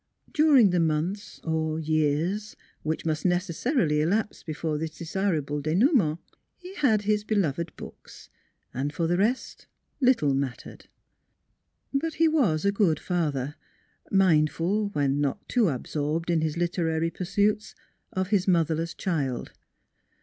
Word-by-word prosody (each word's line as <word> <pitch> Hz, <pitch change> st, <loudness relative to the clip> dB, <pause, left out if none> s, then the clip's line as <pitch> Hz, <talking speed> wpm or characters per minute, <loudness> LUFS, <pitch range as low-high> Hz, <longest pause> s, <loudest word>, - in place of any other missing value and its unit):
During 285 Hz, -, +5 dB
the 180 Hz, -, +2 dB
months 165 Hz, +5 st, -1 dB
or 160 Hz, -1 st, -1 dB
years 160 Hz, +7 st, 0 dB, 0.3 s
which 155 Hz, +1 st, -3 dB
must 155 Hz, -1 st, -1 dB
necessarily 175 Hz, -, +1 dB
elapse 210 Hz, +7 st, 0 dB
before 155 Hz, -1 st, -3 dB
this 160 Hz, 0 st, -5 dB
desirable 160 Hz, -5 st, -1 dB
denouement, 170 Hz, -, +2 dB, 0.4 s
he 365 Hz, +1 st, -11 dB
had 220 Hz, -8 st, +3 dB
his 210 Hz, 0 st, +1 dB
be 215 Hz, +1 st, -1 dB
loved 170 Hz, -3 st, -1 dB
books, -, -, -12 dB, 0.5 s
and 140 Hz, +3 st, -2 dB
for 165 Hz, +2 st, -1 dB
the 175 Hz, +2 st, +1 dB
rest 235 Hz, +6 st, -1 dB, 0.3 s
little 245 Hz, -, +3 dB
mattered. 135 Hz, -2 st, -4 dB, 1.1 s
But 305 Hz, +3 st, -1 dB
he 330 Hz, -, +4 dB
was 225 Hz, -, +2 dB
a 200 Hz, -, +4 dB
good 195 Hz, -7 st, +2 dB
father, 150 Hz, -6 st, -1 dB, 0.6 s
mindful 185 Hz, +2 st, +2 dB
when 145 Hz, -6 st, 0 dB
not 140 Hz, -2 st, -2 dB
too 240 Hz, -5 st, +2 dB
absorbed 150 Hz, +5 st, -2 dB
in 165 Hz, -2 st, +2 dB
his 155 Hz, 0 st, -1 dB
literary 165 Hz, -1 st, 0 dB
pursuits 205 Hz, +4 st, 0 dB, 0.4 s
of 185 Hz, 0 st, -2 dB
his 200 Hz, -3 st, +1 dB
mother 165 Hz, -3 st, +3 dB
less 165 Hz, +1 st, -3 dB
child. 140 Hz, -9 st, -2 dB
170 Hz, 135 wpm, -26 LUFS, 155-205 Hz, 1.1 s, During